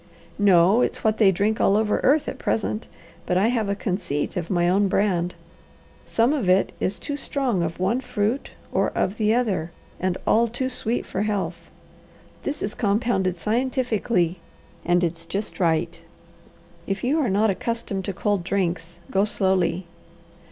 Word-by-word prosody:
"No, 195 +2 +5
it's - - -1
what 220 -1 +2
they 200 -4 +6
drink 205 +4 0
all 200 - +4
over 215 -1 +1
earth 290 +3 +3
at 265 - -5
present, 215 0 -1 0.4
but 180 - +2
I 205 +5 +3
have 225 -4 0
a 200 - 0
conceit 180 -8 -2
of 175 -2 -3
my 175 -2 +2
own 195 +3 +3
brand. 180 -3 +1 0.7
Some 235 +5 +2
of 245 -12 0
it 185 +1 +3
is 190 +1 -1
too 285 +10 -4
strong 265 -8 -1
of 165 0 -3
one 230 +8 +1
fruit 220 +2 -1 0.2
or - - +1
of 195 +3 0
the 215 0 +2
other, 210 -9 0 0.3
and 185 -1 0
all 230 +1 +4
too 250 +3 -2
sweet 240 -2 -2
for 190 - -3
health. 210 -2 -2 0.7
This 290 +1 -4
is 205 - -2
compounded 200 -4 0
scientifically 220 -5 0 0.4
and 175 +1 +2
it's 165 0 -3
just 200 +4 -4
right. 165 -1 0 0.9
If 195 0 -2
you 280 +6 +2
are 275 - +1
not 205 +2 +3
accustomed 210 -1 -3
to 195 - -3
cold 200 -1 0
drinks, 170 -3 -2
go 195 +1 +3
slowly." 190 -3 +1
200 Hz, 165 wpm, -24 LUFS, 180-230 Hz, 0.9 s, they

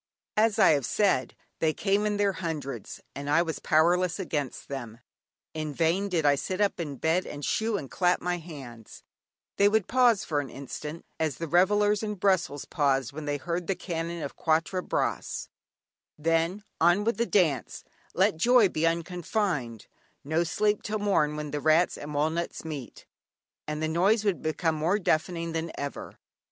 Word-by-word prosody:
As 215 0 +3
I 215 - +6
have 140 -5 +1
said, 190 - +1 0.2
they 160 -1 +2
came 200 +3 +1
in 210 -1 -1
their 200 -1 +2
hundreds, 160 -6 -5
and 140 +1 -5
I 165 +4 +4
was 160 -2 -4
powerless 175 +3 +2
against 150 -8 -3
them. 120 -5 -6 0.6
In 155 -2 -4
vain 175 +5 +1
did 165 -5 0
I 145 - +6
sit 185 +7 -3
up 205 -3 +1
in 150 -4 -4
bed 160 +7 0
and 145 0 -6
"shoo" 220 -1 0
and 140 - -6
clap 180 -1 +2
my 175 0 -2
hands, 135 -9 -11 0.5
they 200 0 +5
would 215 -2 +1
pause 240 -5 +3
for 150 -2 0
an 140 -2 -4
instant, 150 +4 -7
as 155 -4 0
the 165 - -4
revellers 205 +5 +3
in 210 -1 -3
Brussels 185 -7 +1
paused 135 -4 0
when 155 +1 -6
they 145 0 -1
heard 170 +4 -3
the 195 - 0
cannon 170 -2 -4
of 140 - -6
Quatre 165 +3 +1
Bras, - - -2 0.7
then: 165 +5 0 0.2
"On 175 +5 +4
with 230 +2 0
the 235 0 0
dance 155 - +1 0.3
let - - +3
joy 235 +2 +5
be 165 -1 +1
unconfined, 170 - -2 0.4
no 160 +4 +1
sleep 210 +5 +1
till 215 +1 -2
morn 190 -8 +1
when 150 -1 -5
rats 155 +4 +3
and 145 0 -7
walnuts 160 +3 -1
meet," 145 -6 -7 0.6
and 150 +1 -3
the - - +1
noise 195 +7 +2
would 195 -5 +1
become 160 +1 0
more 160 +6 +1
deafening 170 -2 0
than 165 0 -3
ever. 140 0 -6
165 Hz, 170 wpm, -28 LUFS, 150-195 Hz, 0.7 s, I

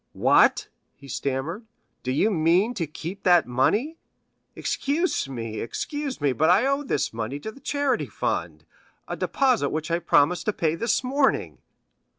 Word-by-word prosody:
"What," - - +4 0.3
he 140 - -15
stammered, 140 - -3 0.3
"do 130 - -3
you 200 +11 +2
mean 180 +6 +2
to 165 -8 -3
keep 170 +6 -7
that 175 -3 +5
money? 210 - 0 0.6
Excuse 295 - -1
me, 115 -4 -5
excuse 290 - -4
me, 145 -3 +1
but 160 +5 +2
I 195 +8 +5
owe 275 +1 +1
this 200 - -1
money 115 +5 -4
to 220 - -6
the 275 - -16
charity 285 0 -1
fund,—a - - -5
deposit 255 - +1
which 155 +1 -3
I 170 - +2
promised 170 0 +2
to 215 - +2
pay 160 -4 0
this 230 +8 0
morning." 270 +2 0
175 Hz, 155 wpm, -25 LUFS, -, 0.6 s, that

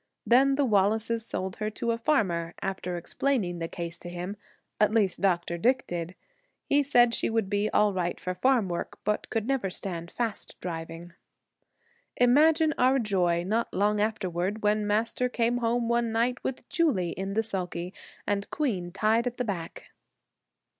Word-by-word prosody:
Then 270 +3 +5
the 285 0 +2
Wallaces 220 +1 +2
sold 185 0 -4
her 215 0 -2
to 230 +2 -2
a 230 - -1
farmer, 180 - 0
after 185 -2 -3
explaining 180 -1 -1
the 165 - -2
case 170 0 -6
to 175 - -8
him 180 +3 -5 0.4
at 210 0 +4
least 210 -5 +1
Dr. 175 -3 +1
Dick 255 +6 +2
did. 175 +1 -5 0.5
He 285 - +3
said 245 -4 +4
she - - +1
would 220 -3 -1
be 205 +1 +1
all 210 -1 +3
right 175 -2 -2
for 180 - -3
farm 240 +2 +2
work, 175 -1 -4
but 210 +1 -1
could 225 -2 -1
never 265 -8 0
stand 170 -2 -4
fast 230 -1 -4
driving. 165 0 -6 1.0
Imagine 305 +5 +5
our 260 +2 +4
joy, 180 -7 +1
not 220 +5 -1
long 205 +1 +2
afterward, 205 -1 -1
when 210 0 +2
Master 225 +4 +1
came 240 0 +1
home 235 0 0
one 235 -1 +1
night 240 +2 0
with 265 - -4
Julie 245 - +1
in 195 +1 -4
the 225 - +2
sulky 180 -4 -4 0.3
and 200 -1 -1
Queen 200 - -2
tied 220 +5 +2
at 245 - -4
the 250 - -1
back. 180 -6 -6
210 Hz, 165 wpm, -28 LUFS, 180-235 Hz, 1.0 s, Then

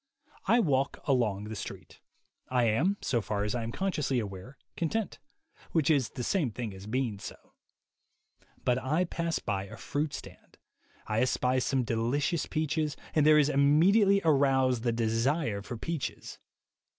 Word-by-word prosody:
I 235 - +5
walk 140 - +1
along 115 -7 +1
the 110 +1 -6
street. 100 - -8 0.5
I 125 -1 +2
am, 140 - +2
so 120 -3 +1
far 105 -1 -2
as 105 +1 -1
I 120 - -1
am 115 0 -4
consciously 150 -6 -1
aware, 105 +4 -5 0.2
content; 200 +6 -2 0.5
which 160 -2 +3
is 135 -6 +2
the 125 - -6
same 165 -2 +1
thing 110 -2 -5
as 95 +1 -10
being 115 -3 -1
so. - - -7 1.3
But 125 -1 +2
I 150 +7 +1
pass 170 -1 -2
a 100 +1 -3
fruit 145 +4 -2
stand; - - -12 0.5
I 110 +1 0
espy 130 0 +1
some 130 0 0
delicious 125 +9 0
peaches, 155 -1 -1 0.2
and 150 -1 +3
there 155 0 +7
is 150 -2 +5
immediately 180 +9 +4
aroused 135 -5 +3
the 120 0 +1
desire 115 +1 0
for 120 +4 -7
peaches. 160 +4 -5
130 Hz, 150 wpm, -29 LUFS, 115-155 Hz, 1.3 s, there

